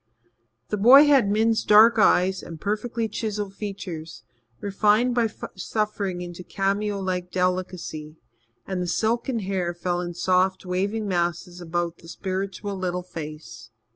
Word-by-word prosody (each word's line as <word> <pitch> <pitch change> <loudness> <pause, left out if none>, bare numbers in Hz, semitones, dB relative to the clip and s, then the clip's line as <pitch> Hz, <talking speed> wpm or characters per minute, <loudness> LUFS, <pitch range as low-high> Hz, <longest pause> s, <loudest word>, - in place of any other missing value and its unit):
The 210 - -1
boy 255 +8 +8
had 275 -8 +4
Min's 220 +2 +2
dark 220 +2 +6
eyes 190 -1 +3
and 165 -2 -9
perfectly 220 +4 -2
chiselled 210 -2 -4
features, 185 -6 -7 0.4
refined 210 +4 +2
by 235 -2 +2 0.3
suffering 200 -2 -2
into 175 0 -7
cameo 200 +2 -1
like 180 -2 -3
delicacy, 180 -4 -2 0.5
and 190 -2 -3
the 180 - -2
silken 230 +4 0
hair 185 -3 -2
fell 175 0 -2
in 175 -1 -5
soft, 185 +2 +1
waving 200 +4 -1
masses 175 0 -2
about 170 0 -2
the 165 - -15
spiritual 195 +3 -4
little 180 -1 -3
face. 155 -7 -9
190 Hz, 135 wpm, -24 LUFS, 175-210 Hz, 0.5 s, boy